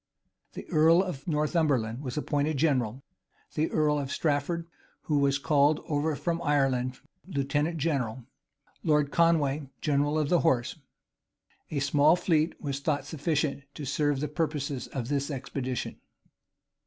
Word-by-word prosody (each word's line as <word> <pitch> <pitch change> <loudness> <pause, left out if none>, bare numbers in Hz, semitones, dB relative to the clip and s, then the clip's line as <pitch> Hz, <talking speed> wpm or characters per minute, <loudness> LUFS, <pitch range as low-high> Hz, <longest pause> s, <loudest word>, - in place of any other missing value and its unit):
[*] - - -47
The - - -8
earl 165 +2 +5
of 160 -8 -6
Northumberland 150 -7 +1
was 130 0 -5
appointed 150 0 0
general; 130 -4 +1 0.5
the 155 +1 0
earl 150 -1 +2
of 140 -1 -4
Strafford, 160 +2 0 0.4
who 150 -2 +1
was 140 -1 +3
called 145 +1 +3
over 150 0 0
from 170 +3 -2
Ireland, 135 -5 +1 0.3
lieutenant 145 +1 -1
general; 130 -6 -1 0.6
Lord 150 -2 +2
Conway, 150 -4 +2
general 145 0 +1
of 150 -2 0
the 175 - +4
horse. 125 -3 +1 0.9
A 155 - -3
small 145 +3 +4
fleet 165 -2 +1
was 140 -2 -3
thought 145 0 -1
sufficient 150 -2 -1
to 150 - -6
serve 145 0 0
the 150 - 0
purposes 150 -3 -2
of 125 -4 -4
this 140 0 -1
expedition. 130 -2 -4
145 Hz, 140 wpm, -28 LUFS, 135-155 Hz, 0.9 s, earl